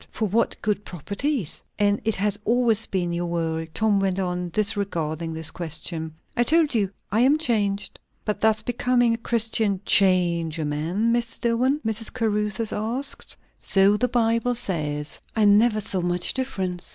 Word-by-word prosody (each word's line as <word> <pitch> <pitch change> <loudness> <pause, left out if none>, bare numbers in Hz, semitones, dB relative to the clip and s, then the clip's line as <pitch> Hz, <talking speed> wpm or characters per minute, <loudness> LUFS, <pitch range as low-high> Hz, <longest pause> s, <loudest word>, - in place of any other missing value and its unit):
"For 220 - -2
what 225 +4 0
good 210 -1 0
properties?" 200 - -3 0.2
"And 205 0 +2
it 220 -1 0
has 205 +1 0
always 230 -1 +2
been 175 -3 -1
your 175 0 -2
world," 165 -1 -2
Tom 215 -2 +2
went 195 -1 0
on, 180 -2 -2
disregarding 170 -5 -1
this 160 0 -1
question. 160 -1 -4 0.2
"I - - +1
told 310 +4 +4
you, 205 -5 +1 0.2
I 215 - +2
am 270 +5 +4
changed." 205 -9 -1 0.3
"But 210 - -2
does 220 0 +2
becoming 245 -1 +2
a - - -1
Christian 225 -3 0
change 175 -4 +3
a 155 - -2
man, 170 +10 0
Mr. 235 -1 -2
Dillwyn?" 250 +5 +1
Mrs. 220 0 -3
Caruthers 210 -2 -1
asked. 240 +6 -3 0.2
"So 195 +1 +3
the 250 +4 +1
Bible 235 0 +1
says." 150 -9 -2 0.2
"I 220 -1 +3
never 215 +2 +4
saw 195 -3 -2
much 175 0 +2
difference. 190 -9 -3
205 Hz, 160 wpm, -24 LUFS, 175-230 Hz, 0.3 s, told